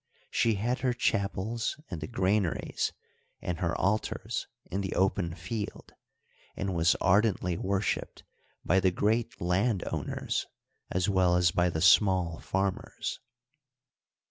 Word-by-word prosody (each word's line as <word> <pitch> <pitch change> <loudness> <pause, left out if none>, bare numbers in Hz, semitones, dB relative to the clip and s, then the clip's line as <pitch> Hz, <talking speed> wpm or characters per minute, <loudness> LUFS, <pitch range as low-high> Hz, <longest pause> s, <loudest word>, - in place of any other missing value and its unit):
She 115 -2 +2
had 120 +6 -1
her 130 -2 +1
chapels 110 +3 -1
in 85 - -4
the 80 - -5
granaries 95 -1 0 0.5
and 85 -2 -3
her 85 -2 0
altars 105 +3 -1 0.2
in 95 +2 -3
the 95 - -3
open 95 -3 +1
field, 100 +5 -5 0.7
and 95 -1 -2
was 85 0 +3
ardently 100 -2 +2
worshiped 95 +2 -2 0.4
by 95 +3 +4
the 95 0 +4
great 110 +5 0
land 95 +4 +1
owners - - -2 0.4
as 90 0 0
well 95 -3 +3
as 90 -2 +4
by 90 +2 +2
the 80 -2 -2
small 90 -2 +4
farmers. 95 0 -2
95 Hz, 125 wpm, -29 LUFS, 90-105 Hz, 0.7 s, by